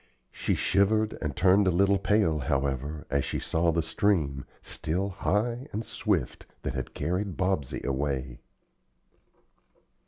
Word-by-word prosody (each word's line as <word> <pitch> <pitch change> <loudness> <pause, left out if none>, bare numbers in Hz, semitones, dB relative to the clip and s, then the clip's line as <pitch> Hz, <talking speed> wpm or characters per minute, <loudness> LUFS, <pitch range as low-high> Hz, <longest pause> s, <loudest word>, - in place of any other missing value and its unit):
She - - -1
shivered 110 +3 +2
and 75 -2 -2
turned 95 +3 +4
a - - +6
little 100 +2 +3
pale, 100 -5 +2
however, 70 +3 -1
as 70 0 +2
she - - -2
saw 85 +1 +1
the 85 0 +1
stream, 80 -6 0 0.2
still 90 +6 -2
high 115 +7 -1
and 110 +2 -3
swift, 95 - -1 0.2
that - - -2
had - - -5
carried 90 +4 -2
Bobsey 95 -8 -1
away. 65 -2 -2
85 Hz, 130 wpm, -28 LUFS, 70-100 Hz, 0.2 s, a